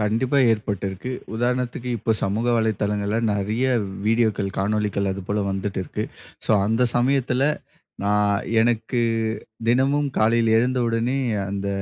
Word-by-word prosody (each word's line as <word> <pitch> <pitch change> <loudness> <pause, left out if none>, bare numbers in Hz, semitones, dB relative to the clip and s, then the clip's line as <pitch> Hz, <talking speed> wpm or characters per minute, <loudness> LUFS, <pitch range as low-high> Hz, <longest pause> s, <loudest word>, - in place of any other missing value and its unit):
கண்டிப்பா 115 +6 +1
ஏற்பட்டு 105 -3 -2
இருக்கு. 95 +7 -6 0.2
உதாரணத்துக்கு 125 +1 -1
இப்போ, 110 - +1
சமூக 105 +5 -1
வலைத்தளங்கள்ல 105 -1 0
நெறைய 105 +5 0 0.4
வீடியோக்கள், 110 -3 +2
காணொளிகள் 100 -1 0
அதுபோல 100 +2 -2
வந்துட்டு 95 0 -2
இருக்கு. - - -4 0.4
சோ - - -1 0.2
அந்த 115 +3 +1
சமயத்துல 130 0 +2 0.6
நான் 105 0 +2 0.2
எனக்கு 120 +1 +1 0.7
தினமும் 135 +4 +2
காலைல 115 +1 +3
எழுந்த 125 +2 +1
உடனே 115 +4 0 0.3
அந்த 100 0 -3
110 Hz, 115 wpm, -23 LUFS, 100-120 Hz, 0.7 s, காலைல